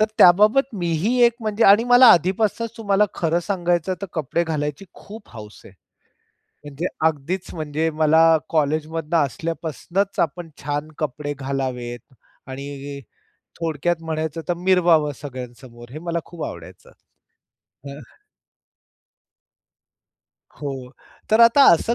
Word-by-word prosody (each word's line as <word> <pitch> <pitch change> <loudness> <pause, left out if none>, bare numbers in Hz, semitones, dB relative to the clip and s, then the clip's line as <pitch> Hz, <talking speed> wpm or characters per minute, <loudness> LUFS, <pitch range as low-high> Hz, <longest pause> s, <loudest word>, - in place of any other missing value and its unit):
तर 215 - +4
त्याबाबत 215 +8 +5
मीही 170 +9 0
एक 235 - +4
म्हणजे 215 +1 0
आणि 205 +4 +6
मला 245 +1 +7
आधीपासूनच 205 +6 0
तुम्हाला 205 -1 +2
खरं 170 +1 0
सांगायचं 175 -1 -1
तर - - -3
कपडे 165 +2 -1
घालायची 150 +1 -3
खूप 210 +1 -13
हौस 105 -1 -11
आहे. - - -14 0.9
म्हणजे 145 +4 -5 0.2
अगदीच 160 +5 -2
म्हणजे 155 0 -2
मला 160 +1 +5 0.3
कॉलेजमधनं 155 +1 -1
असल्यापासनुच 165 +6 -4
आपण 170 0 -2
छान 145 +1 -3
कपडे 145 0 -3
घालावेत 130 -2 -5 0.3
आणि 140 +1 -7 0.6
थोडक्यात 165 +1 -1
म्हणायचं 160 0 -3
तर 175 - +1
मिरवावं 175 -4 +3
सगळ्यांसमोर, 125 -3 -10
हे 155 - -7
मला 170 0 -3
खूप 170 -3 -9
आवडायचं. 85 +2 -11 1.0
हां. 140 +2 -9 2.6
हो, 135 -3 -6 0.4
तर 220 +2 +4
आता 235 +5 +7
असं 205 +8 +1
160 Hz, 115 wpm, -21 LUFS, 145-185 Hz, 2.6 s, मला